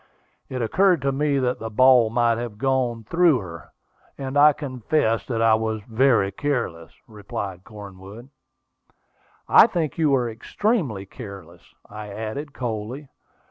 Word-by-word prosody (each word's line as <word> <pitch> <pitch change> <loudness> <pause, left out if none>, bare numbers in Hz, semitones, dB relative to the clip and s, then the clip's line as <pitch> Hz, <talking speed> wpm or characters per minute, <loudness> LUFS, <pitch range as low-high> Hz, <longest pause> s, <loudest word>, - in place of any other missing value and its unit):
It 130 -2 -3
occurred 180 - +3
to 140 - +1
me 145 +1 0
that 125 -2 -1
the 110 - -5
ball 125 0 +5
might 115 0 +1
have 120 -3 -6
gone 125 -2 -1
through 170 +4 +3
her, 85 - -9 0.5
and 135 0 -5
I 150 +1 +7
confess 130 -4 -1
that 115 -3 -1
I 115 -1 +5
was 110 -1 -1
very 115 -3 +2
careless," 95 - -3
replied 100 -4 -7
Cornwood. 100 +3 -12 1.2
"I - - +7
think 165 -2 -3
you 155 -2 +3
were, 130 -3 +2
extremely 115 - -2
careless," 95 -6 -11 0.3
I 105 0 -9
added 110 +8 -6
coldly. 120 +3 -5
120 Hz, 140 wpm, -23 LUFS, 105-135 Hz, 1.2 s, I